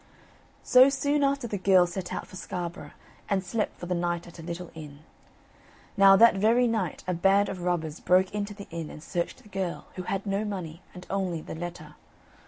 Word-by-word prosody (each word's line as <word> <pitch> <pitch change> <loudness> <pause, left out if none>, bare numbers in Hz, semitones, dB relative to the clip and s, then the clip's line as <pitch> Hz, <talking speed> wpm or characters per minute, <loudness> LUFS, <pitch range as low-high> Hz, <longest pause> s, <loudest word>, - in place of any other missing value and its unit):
So 255 +2 +7
soon 285 +1 +1
after 275 -2 +1
the 210 -4 -3
girl 185 -1 +5
set 175 +1 -5
out - - -4
for - - -14
Scarborough, 175 -1 -5 0.4
and 195 -2 +1
slept 210 +4 -2
for - - -6
the 180 - -1
night 175 0 -1
at 170 0 -13
a - - -6
little 170 +1 -6
inn. 150 -2 -10 0.9
Now 195 -1 +7
that 230 0 +6
very 230 +5 +4
night 220 -8 -1
a 180 - +1
band 195 +4 +3
of 185 - -5
robbers 170 -3 -2
broke 185 +2 +3
into 205 0 -3
the 200 -1 -9
inn, 165 -2 -5
and 150 - -10
searched 170 -1 -3
the 210 - -17
girl, 190 -3 -3
who - - -2
had 195 +2 -3
no 200 +1 -1
money, 185 -5 -5
and 180 0 -10
only 190 -4 -1
the - - -8
letter. 160 -2 -7
185 Hz, 200 wpm, -27 LUFS, 175-205 Hz, 0.9 s, So